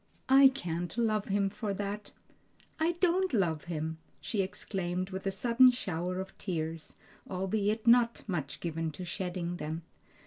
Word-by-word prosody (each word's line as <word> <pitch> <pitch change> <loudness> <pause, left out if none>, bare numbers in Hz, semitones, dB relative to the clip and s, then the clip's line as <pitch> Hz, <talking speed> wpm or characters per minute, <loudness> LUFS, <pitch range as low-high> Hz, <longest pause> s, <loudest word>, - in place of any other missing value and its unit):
I 270 +1 +9
can't 175 -8 -3
love 215 -3 +1
Him 195 0 +1
for 205 -1 -3
that! 205 +1 -4 0.7
I 325 +2 +2
don't 360 +1 +2
love 165 -7 +1
Him!" 160 -1 -3 0.2
she 210 - -1
exclaimed 185 -1 -3
with 190 +1 -4
a - - +2
sudden 245 +5 +5
shower 180 -6 -2
of 190 0 -6
tears, 165 -3 -4 0.3
albeit 205 +4 0
not 235 0 +5
much 155 -8 -3
given 165 -1 -2
to 180 +5 -6
shedding 175 -1 -3
them. 160 +2 -4
190 Hz, 145 wpm, -31 LUFS, 175-220 Hz, 0.7 s, I